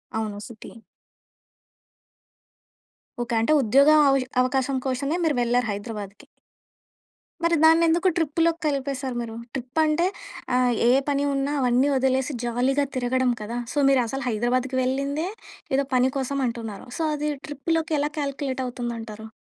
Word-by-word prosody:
అవును. 215 -2 -3
City. 230 0 -12 2.4
Okay. 240 -1 -2
అంటే 265 - +1
ఉద్యోగ 270 +5 +4 0.2
అవ 275 - +4 0.3
అవకాశం 265 +1 0
కోశమే 275 +5 -1
మీరు 305 -4 +2
వెళ్లారు 240 0 +1
హైదరాబాద్‌కి. 205 +2 -7 1.2
మరి 335 0 +3
దాన్నెందుకు 330 +2 +5
ట్రిప్‌లోకి 330 +1 +1
కలిపేసారు 275 -3 -2
మీరు? 225 -1 -6 0.2
ట్రిప్ 260 +3 -4
అంటే 310 +3 +2 0.5
ఆహ్, 250 -1 +3 0.2
ఏ - - +6 0.2
పని 280 0 +1
ఉన్నా 275 +1 -1
అవన్నీ 250 +2 +3
వదిలేసి 265 +1 +1
జాలీగా 260 +4 +1
తిరగడం 255 0 +1
కదా! 230 +3 -4 0.2
సో - - -6
మీరు 270 -2 +4
అసలు 270 +2 -4
హైదరాబాద్‌కి 250 +4 0
వెళ్ళిందే 275 +6 -1 0.5
ఏదో 275 0 +1
పని 255 +1 +4
కోసం 275 +1 -2
అంటున్నారు. 230 -2 -6
సో - - -3
అది 300 +1 -2 0.2
ట్రిప్‌లోకి 320 +2 -1
ఎలా 295 +1 -1
కాలిక్యులేట్ 275 -2 -3
అవుతుందంటారు. 230 -3 -6
265 Hz, 130 wpm, -24 LUFS, 240-285 Hz, 2.4 s, ఏ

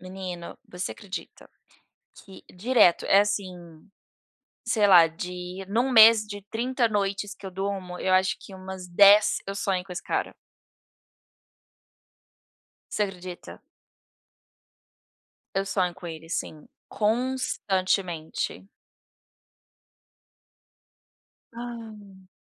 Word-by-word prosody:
Menino, 185 -2 -7
você 180 +1 -5
acredita 200 -2 -9 0.8
que 190 -1 -14
direto, 210 -2 +3
é, 195 - +6
assim, 185 -5 -4 0.8
sei 220 -3 +3
lá, 175 -4 +8
de 165 +3 -7
em 185 +4 -5
um 260 +2 +2
mês 225 -2 +8
de 205 -1 -8
30 240 +1 0
noites 200 -1 -2
que 195 - -11
eu - - -6
durmo, 190 -1 -4
eu 185 - 0
acho 190 0 +2
que 195 - -12
umas 185 -1 -8
10 200 +4 +6
eu 195 - -4
sonho 190 -2 -1
com 185 - -9
esse 180 - -6
cara. - - -2 2.6
Você 210 - 0
acredita. 180 -2 -7 2.0
Eu 195 - +1
sonho 185 -3 -1
com 190 - -15
ele 165 -1 -8
sim, 155 -2 -5 0.2
constantemente. 200 -8 -1 2.8
Hã. 220 -5 -10
195 Hz, 100 wpm, -26 LUFS, 180-210 Hz, 2.8 s, lá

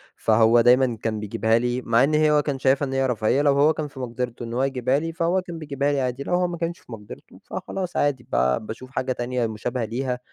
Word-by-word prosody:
فهو 115 +1 +4
دايمّا 125 0 +4
كان 110 -1 -2
بيجيبها 110 +2 +1
لي 125 +1 -1
مع 115 +2 +3
إن 150 +2 +2 0.2
هو 150 - +4
كان 140 -2 -3
شايفها 135 +2 +2
إن 135 - -5
هي 135 0 +1
رفاهية 120 +3 +1
لو 145 -1 +4
هو 145 +3 +4
كان 155 -1 -4
في 135 -2 -12
مقدرتُه 120 -1 -4
إن 115 0 -6
هو 130 +2 0
يجيبها 130 0 +1
لي 165 +1 -4
فهو 170 +3 +1
كان 175 -3 -8
بيجيبها 145 -1 -1
لي 140 -1 0
عادي، 130 +1 -2
لو 175 - -3
هو 180 0 +2
ما 175 -1 -5
كانش 170 +1 -3
في - - -18
مقدرتُه 105 -2 -11
فخلاص 185 -2 -5
عادي، 135 -4 0
با 65 0 +2
باشوف 115 +4 -8
حاجة 130 -1 -2
تانية 125 -1 -1
مشابهة 115 +2 -3
ليها، 125 +2 -3
130 Hz, 240 wpm, -23 LUFS, 115-145 Hz, 0.2 s, فهو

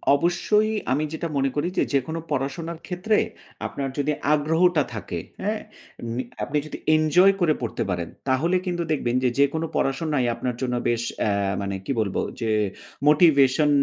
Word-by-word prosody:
অবশ্যই 180 +7 +2 0.2
আমি 145 +4 +2
যেটা 165 +1 -3
মনে 135 0 +2
করি 145 +3 0
যে - - +4
যেকোনো 140 +5 0
পড়াশোনার 150 +4 -2
ক্ষেত্রে 190 +4 +1 0.5
আপনার 140 -1 -4
যদি 145 +1 +1 0.2
আগ্রহটা 160 +2 +3
থাকে। 95 -5 -4 0.2
হ্যাঁ? 210 +2 -1 0.5
মি 130 - -1 0.2
আপনি 150 - -1
যদি - - -6 0.2
এনজয় 170 +5 +5
করে 165 -3 +4
পড়তে 120 - -2
পারেন 85 -3 -2 0.2
তাহলে 155 +8 +2
কিন্তু 175 -2 -1
দেখবেন 125 -5 0
যে 125 - +4
যেকোনো 145 +3 +2
পড়াশোনাই 135 -1 0
আপনার 120 +1 -3
জন্য 125 -1 0
বেশ 120 0 0 0.2
অ্যা 105 - +1 0.3
মানে 100 0 -2
কি - - -2
বলব 100 -3 -1 0.3
যে 115 -1 0 0.6
মোটিভেশন 150 -2 +5
150 Hz, 155 wpm, -24 LUFS, 130-170 Hz, 0.6 s, এনজয়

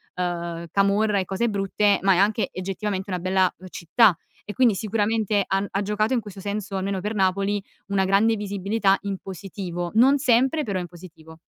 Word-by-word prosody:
ehm, 170 -1 -3
camorra 200 +1 +2
e 190 - -2
cose 195 +6 -1
brutte 200 0 +1
ma 195 0 +5
è - - +1
anche 210 +3 +2
oggettivamente 195 +1 -4
una 180 -1 -2
bella, 185 +1 +2
uhm, 185 - -12
città 185 +4 +3 0.3
e 210 - -6
quindi 245 -4 +3
sicuramente 215 0 0
han 195 +1 0
ha 195 - -2
giocato 210 +4 0
in 245 - +2
questo 200 -2 -11
senso, 205 0 -4
almeno 190 0 -2
per 210 +3 -3
Napoli, 195 +1 0 0.2
una 195 -1 +1
grande 205 +4 +3
visibilità 200 0 0
in 200 -1 -4
positivo. 180 -2 -6
Non 260 +6 +5
sempre, 260 +4 +2
però 200 -4 -2
in 175 - -5
positivo. 165 -2 -14
195 Hz, 180 wpm, -24 LUFS, 185-210 Hz, 0.3 s, ma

